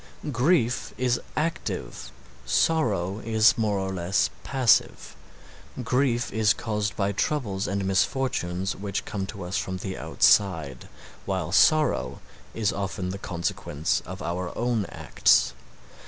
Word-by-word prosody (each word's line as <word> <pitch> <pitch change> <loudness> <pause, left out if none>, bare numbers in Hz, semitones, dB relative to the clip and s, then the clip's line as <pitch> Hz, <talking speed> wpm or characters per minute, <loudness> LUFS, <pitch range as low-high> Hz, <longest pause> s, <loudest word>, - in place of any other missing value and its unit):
Grief 125 -2 +1
is 125 -1 +1
active, 155 - -3 0.3
sorrow 100 - +1
is 110 0 +4
more 105 -3 0
or 95 0 -2
less 90 +1 0
passive; 130 -4 +2 0.7
grief 125 -1 0
is 110 -1 +3
caused 105 -1 -2
by 100 -2 0
troubles 100 -3 -1
and 100 +1 -2
misfortunes 95 -2 0
which 100 0 -4
come 95 -2 -4
to 100 -2 -7
us 90 +2 -3
from 95 -1 -4
the 95 +1 -5
outside, 80 -10 +2 0.4
while 95 -4 -2
sorrow 140 - +3 0.4
is 110 -2 0
often 95 -1 -3
the 95 +1 -5
consequence 85 -4 -2
of 95 +2 -7
our 90 +1 -3
own 120 -4 0
acts. - - +2
100 Hz, 125 wpm, -26 LUFS, 90-115 Hz, 0.7 s, is